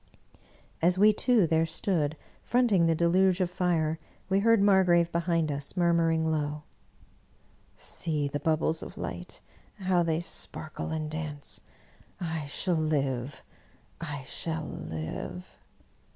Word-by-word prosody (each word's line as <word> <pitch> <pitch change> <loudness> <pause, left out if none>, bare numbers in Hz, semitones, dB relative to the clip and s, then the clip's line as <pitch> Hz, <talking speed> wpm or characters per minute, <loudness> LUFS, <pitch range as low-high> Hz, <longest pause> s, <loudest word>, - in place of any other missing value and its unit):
As 175 +2 +3
we 210 +2 +6
two 235 -3 +3
there 160 0 +2
stood, 160 -3 -1 0.3
fronting 225 -9 +3
the 165 - +3
deluge 180 +3 +3
of 180 -2 0
fire, 165 -4 0 0.3
we 190 +1 +3
heard 230 +1 +5
Margrave 180 -4 +4
behind 165 -2 +1
us, 140 +5 -6
murmuring 165 -2 +3
low, 150 -1 -2 0.6
" - - -34 0.2
See 150 -3 -2
the 145 +1 -3
bub 155 +2 +1
bles 160 - 0
of - - -9
light, - - -6 0.3
how 185 -3 +1
they 165 -1 +1
sparkle 155 -2 -6
and 155 -1 -2
dance 155 -2 -6 0.3
— - - -30
I 160 -4 -3
shall 180 +6 -1
live, 140 -5 -1 0.6
I 145 -5 -5
shall 160 +3 -4
live 80 - -5
165 Hz, 135 wpm, -29 LUFS, 155-180 Hz, 0.6 s, we